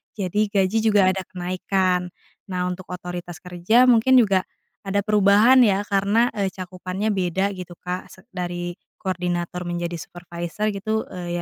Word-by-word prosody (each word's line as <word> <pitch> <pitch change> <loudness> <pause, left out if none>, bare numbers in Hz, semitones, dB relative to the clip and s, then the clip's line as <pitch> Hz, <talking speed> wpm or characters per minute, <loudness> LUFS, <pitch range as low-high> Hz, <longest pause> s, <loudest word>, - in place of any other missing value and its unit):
Jadi 205 +1 0
gaji 200 +1 +1
juga 205 -4 +4
ada 190 0 -2
kenaikan. 180 0 -1 0.4
Nah, 180 0 -1
untuk 180 0 -6
otoritas 175 -1 -6
kerja 180 +7 +3
mungkin 245 +2 +5
juga 195 -5 +3 0.4
ada 200 0 0
perubahan 210 +4 +5
ya, 200 0 +2
karena, 205 +4 +2
eee, 200 - +1
cakupannya 185 +2 -4
beda 190 +1 0
gitu 180 -2 -8
Kak. 180 +2 -5
Se 185 - -17
dari 175 -1 -4 0.3
koordinator 180 -1 -2
menjadi, 175 0 -3
supervisor 175 +5 -4
gitu, 215 +2 -2
eee, 180 -2 -6
185 Hz, 140 wpm, -23 LUFS, 180-205 Hz, 0.4 s, mungkin